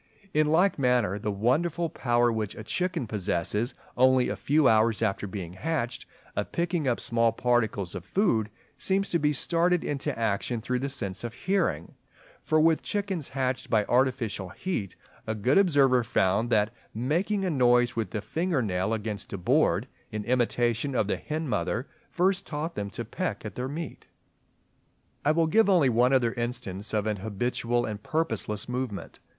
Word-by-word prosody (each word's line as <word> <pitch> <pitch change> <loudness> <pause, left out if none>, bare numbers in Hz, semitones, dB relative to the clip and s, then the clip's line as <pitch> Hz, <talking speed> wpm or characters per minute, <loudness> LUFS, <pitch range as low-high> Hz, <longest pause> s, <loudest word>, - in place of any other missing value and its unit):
In 155 0 +3
like 170 +3 +3
manner 125 -6 +2
the 105 - -3
wonderful 150 - +1
power 120 -5 +1
which 110 -2 -3
a 110 - -7
chicken 180 - -1
possesses 105 +2 -1 0.2
only 130 0 +4
a - - -2
few 150 -1 +3
hours 110 0 +3
after 105 -1 -1
being 95 -3 -6
hatched, 135 - -3 0.3
of - - -2
picking 170 -3 -1
up 120 - +1
small 115 -1 +2
particles 110 -7 0
of 90 - -6
food, 115 - +1 0.3
seems 195 +6 0
to 170 - +2
be 150 0 +2
started 170 +4 +1
into 140 -5 -2
action 115 +1 -1
through 125 +3 -2
the 140 +2 -2
sense 100 -9 -3
of 120 -1 -5
hearing; 195 +1 -1 0.5
for 155 - +2
with 160 0 +4
chickens 195 -7 -2
hatched 130 -1 -2
by 105 -3 +3
artificial 120 -7 0
heat, 105 - -4 0.3
a 110 - -1
good 125 - +3
observer 140 -9 +4
found 110 -1 +1
that 105 0 +2 0.2
"making 175 - 0
a 180 - 0
noise 125 -2 +3
with 110 -4 -1
the 105 - -3
finger 160 - -1
nail 95 +2 0
against 105 -2 -5
a - - -2
board, 90 - +2 0.2
in 105 -1 -3
imitation 120 +1 +1
of 110 - +2
the 105 - -1
hen 155 +1 -4
mother, 125 0 -1 0.2
first 190 +2 +1
taught 155 +2 -3
them 100 -1 -4
to - - -6
peck - - -3
at - - -5
their 125 +1 -4
meat." 160 +4 -6 1.2
I 150 - +4
will 165 +1 +3
give 215 +6 +4
only 170 -9 +5
one 125 +2 +3
other 120 -4 +3
instance 110 -4 -3
of 105 -1 0
an 105 -1 -1
habitual 120 +4 -1
and 105 -1 -5
purposeless 155 -9 -2
movement. 125 -4 -4
125 Hz, 170 wpm, -27 LUFS, 110-155 Hz, 1.2 s, only